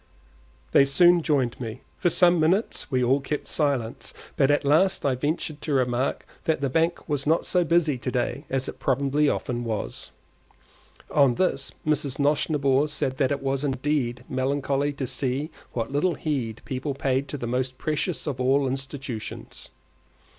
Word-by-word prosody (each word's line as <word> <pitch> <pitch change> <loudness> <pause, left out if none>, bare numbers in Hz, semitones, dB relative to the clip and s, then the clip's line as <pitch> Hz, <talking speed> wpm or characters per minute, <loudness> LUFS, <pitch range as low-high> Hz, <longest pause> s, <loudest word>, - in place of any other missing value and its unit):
They - - +7
soon 175 +5 +5
joined 135 -7 0
me. 115 0 -6 0.2
For 175 - +3
some 175 0 +5
few - - +2
minutes 185 +8 +1
we 130 -2 +1
all 130 +3 +3
kept 150 +2 -4
silence, 140 -7 -1 0.2
but 135 - +3
at 145 0 +2
last 165 +7 +3
I 135 - +3
ventured 145 +3 -2
to 150 - -2
remark 125 0 0 0.2
that 160 - +1
the 140 -2 -1
bank 165 +4 0
was 145 -2 -2
not 160 +2 +2
so 180 -1 +2
busy 165 -5 +2
to 125 - -3
day 130 +3 -2
as 135 0 -1
it - - -7
probably 140 +2 +2
often 120 -3 -2
was. 110 -3 -4 1.0
On 140 -4 +4
this 140 -5 0
Mrs. 145 -3 0
Nosnibor 145 -1 +2
said 135 -3 -2
that 135 -1 +1
it 140 -1 -2
was 135 0 -1
indeed 130 -3 -1
melancholy 140 +2 0
to 140 -1 -3
see 135 +4 -2 0.2
what 115 +1 -2
little 155 +5 +1
heed 125 -8 -3
people 135 +2 -3
paid 135 0 0
to 145 - -5
the 120 - -5
most 130 +2 -2
precious 155 +5 -2
of 135 -5 -3
all 135 +2 +3
institutions. 130 -4 -6
140 Hz, 170 wpm, -25 LUFS, 130-150 Hz, 1.0 s, They